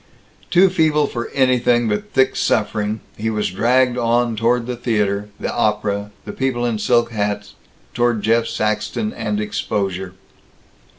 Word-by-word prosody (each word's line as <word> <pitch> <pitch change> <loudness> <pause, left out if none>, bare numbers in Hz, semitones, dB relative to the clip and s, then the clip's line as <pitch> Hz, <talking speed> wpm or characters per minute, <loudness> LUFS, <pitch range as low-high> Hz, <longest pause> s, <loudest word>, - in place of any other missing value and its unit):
Too 185 +1 +5
feeble 155 -4 +2
for 120 -4 -4
anything 125 -3 +2
but 105 -1 -2
thick 130 -1 +2
suffering 105 0 0 0.2
he 110 +1 -1
was 105 -4 -1
dragged 125 +5 +2
on 120 0 +1
toward 115 +2 +1
the 125 0 -3
theater, 105 -4 -1
the - - -3
opera, 105 -2 0 0.3
people 130 -2 0
in 115 -3 -1
silk 120 +2 +2
hats 105 -1 -2 0.4
toward 120 -3 +1
Jeff 115 +1 +2
Saxton 110 - -2
and 210 - -2
exposure. 100 - -3
115 Hz, 135 wpm, -20 LUFS, 105-125 Hz, 0.4 s, Too